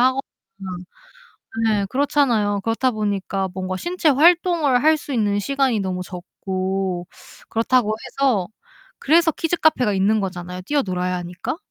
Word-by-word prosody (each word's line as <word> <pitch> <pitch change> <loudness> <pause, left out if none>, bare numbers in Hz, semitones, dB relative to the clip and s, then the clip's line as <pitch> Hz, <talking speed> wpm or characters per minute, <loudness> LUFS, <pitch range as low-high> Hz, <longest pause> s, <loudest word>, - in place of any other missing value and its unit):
하거나 260 +2 +3 1.5
네 210 -2 +1
그렇잖아요. 240 -7 +1
그렇다 230 +3 +1
보니까 200 -3 -2
뭔가 185 0 -3
신체 345 - 0
활동을 320 -2 +4
할 315 +1 +5
수 290 - -8
있는 205 -4 +1
시간이 265 +1 +1
너무 185 -2 -3
적고 185 0 -4 0.4
그렇다고 225 -1 +1
해서 245 -10 0 0.5
그래서 330 +3 +4
키즈 330 +2 -1
카페가 255 -10 +2
있는 200 +3 +2
거잖아요. 180 -1 -5
뛰어놀아야 180 -8 -1
하니까. 180 - -5
215 Hz, 315 characters per minute, -21 LUFS, 190-275 Hz, 1.5 s, 할